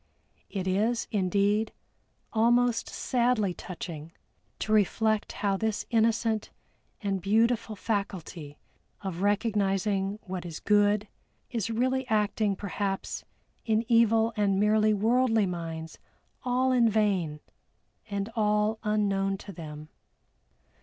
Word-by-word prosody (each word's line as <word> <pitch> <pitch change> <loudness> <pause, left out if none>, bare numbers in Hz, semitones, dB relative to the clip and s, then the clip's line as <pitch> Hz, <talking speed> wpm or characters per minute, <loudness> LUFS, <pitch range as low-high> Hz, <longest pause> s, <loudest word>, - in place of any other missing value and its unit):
It 190 -2 -3
is, 220 +5 +1
indeed, 205 +2 +1 0.6
almost 240 +1 +3
sadly 240 -6 +1
touching 165 -3 -7 0.5
to 215 - -3
reflect 215 +1 +2
how 200 -1 0
this 220 0 -1
innocent 225 -1 +1 0.5
and 195 -2 -1
beautiful 225 +2 +2
faculty 185 -8 -4 0.4
of 190 -3 -4
recognizing 200 -1 +1
what 185 -2 -5
is 165 -3 -7
good, 205 0 +3 0.4
is 230 -3 -2
really 255 +3 0
acting 210 -2 +1
perhaps 195 0 -3 0.4
in 220 0 +1
evil 230 -1 +4
and 200 -3 +2
merely 215 +1 +4
worldly 225 +1 +3
minds 165 -3 -5 0.4
all 255 +1 +1
in 240 -3 +4
vain, 195 -8 +1 0.7
and 200 0 -2
all 210 0 +1
unknown 195 -2 +1
to 200 - -10
them. 155 -3 -9
210 Hz, 105 wpm, -28 LUFS, 195-225 Hz, 0.7 s, evil